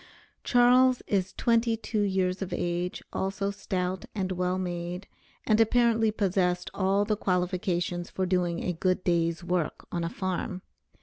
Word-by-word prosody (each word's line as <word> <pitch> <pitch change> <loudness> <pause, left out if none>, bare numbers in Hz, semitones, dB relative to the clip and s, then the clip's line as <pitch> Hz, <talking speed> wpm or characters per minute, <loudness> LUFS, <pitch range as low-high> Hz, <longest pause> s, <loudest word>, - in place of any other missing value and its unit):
Charles 250 +1 +4
is 190 -2 0
twenty 230 -1 +2
two 215 -1 -2
years 190 -2 0
of 190 - -4
age, 175 +1 -2
also 195 +1 -1
stout, 185 -2 -3
and 190 -2 -1
well 180 0 0
made, 175 0 -4 0.4
and 215 0 +4
apparently 230 -1 +3
possessed 185 -4 0
all 195 +1 +2
the 215 0 +1
qualifications 180 -2 -1
for 190 - -2
doing 180 -2 0
a 180 - -1
good 185 +2 0
day's 170 -1 +1
work 175 -3 -2
on 170 -1 -2
a 165 - -1
farm. 185 0 -3
185 Hz, 145 wpm, -28 LUFS, 180-205 Hz, 0.4 s, Charles